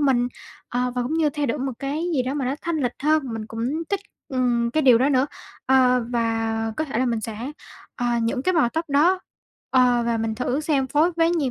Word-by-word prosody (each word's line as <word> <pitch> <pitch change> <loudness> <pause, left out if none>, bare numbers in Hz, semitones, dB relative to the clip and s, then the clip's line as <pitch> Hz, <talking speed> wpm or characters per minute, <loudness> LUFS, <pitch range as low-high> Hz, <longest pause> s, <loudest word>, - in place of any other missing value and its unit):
mình. 255 -4 +2 0.4
Ờ, 250 0 -1
và 250 - 0
cũng 255 +6 -2
như 320 -2 +2
thay 290 0 -2
đổi 255 - -1
một 265 0 -2
cái 285 +4 -2
gì 255 - +2
đó 260 +3 -3
mà 280 - -1
nó 260 +2 0
thanh 340 -1 -1
lịch 250 -5 0
hơn, 310 +1 +3
mình 220 -1 -5
cũng 225 +1 -5 0.3
thích, 400 -1 -1 0.3
ừm, 245 -3 +1
cái 310 +5 +1
điều 250 -4 +6
đó 265 - +3
nữa. 265 -1 +3 0.4
Ờ, 250 -2 +4
và 225 -1 0
có 310 - 0
thể 265 -6 -3
là 255 - +2
mình 230 -2 0
sẽ, 215 0 -6 0.6
ờ, 245 - -1 0.2
những 250 +3 -1
cái 370 - +2
màu 310 -8 +4
tóc 325 +7 -2
đó, 325 +7 +3 0.5
ờ, 250 -2 +4
và 235 -1 +1
mình 225 0 -1
thử 250 +4 -1
xem 285 -4 +1
phối 315 +6 +2
với 330 0 +3
gì 270 -3 0
255 Hz, 235 wpm, -23 LUFS, 235-295 Hz, 0.6 s, điều